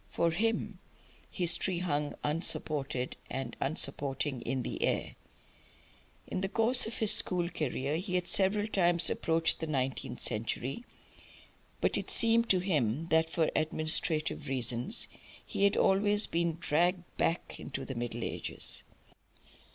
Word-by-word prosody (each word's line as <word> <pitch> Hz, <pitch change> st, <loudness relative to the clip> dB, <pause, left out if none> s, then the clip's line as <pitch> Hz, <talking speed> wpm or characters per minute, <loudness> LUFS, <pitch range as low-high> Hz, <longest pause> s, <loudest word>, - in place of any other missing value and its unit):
For 170 Hz, 0 st, 0 dB
him 215 Hz, +1 st, -2 dB, 0.5 s
history 175 Hz, +1 st, +1 dB
hung 150 Hz, -4 st, -2 dB
unsupported 145 Hz, -4 st, +2 dB
and 130 Hz, -3 st, -5 dB
unsupporting 140 Hz, -2 st, +2 dB
in 130 Hz, +2 st, -3 dB
the -, -, -5 dB
air. -, -, -1 dB, 1.1 s
In 185 Hz, -, -4 dB
the 195 Hz, -, -2 dB
course 230 Hz, +3 st, +3 dB
of 230 Hz, -, -6 dB
his 220 Hz, -2 st, +4 dB
school 175 Hz, -2 st, +1 dB
career 150 Hz, -3 st, -2 dB
he 185 Hz, +1 st, -4 dB
had 180 Hz, -1 st, -1 dB
several 205 Hz, +1 st, +2 dB
times 175 Hz, -5 st, +3 dB
approached 165 Hz, 0 st, +2 dB
the 160 Hz, -, -4 dB
nineteenth 130 Hz, -3 st, -3 dB
century, 120 Hz, -, -3 dB, 1.0 s
but -, -, +1 dB
it -, -, -7 dB
seemed 230 Hz, 0 st, +2 dB
to 190 Hz, -, +4 dB
him 160 Hz, -, -1 dB
that 160 Hz, 0 st, +2 dB
for 160 Hz, -1 st, 0 dB
administrative 155 Hz, -1 st, 0 dB
reasons 125 Hz, -2 st, -1 dB, 0.4 s
he 200 Hz, -, +1 dB
was -, -, -5 dB
always 205 Hz, +2 st, +3 dB
being 170 Hz, 0 st, -1 dB
dragged 175 Hz, +3 st, 0 dB
back 165 Hz, -, -1 dB
again -, -, -9 dB
to -, -, -5 dB
the 135 Hz, -, -6 dB
Middle 120 Hz, -1 st, -4 dB
Ages. -, -, -1 dB
165 Hz, 135 wpm, -30 LUFS, 135-185 Hz, 1.1 s, his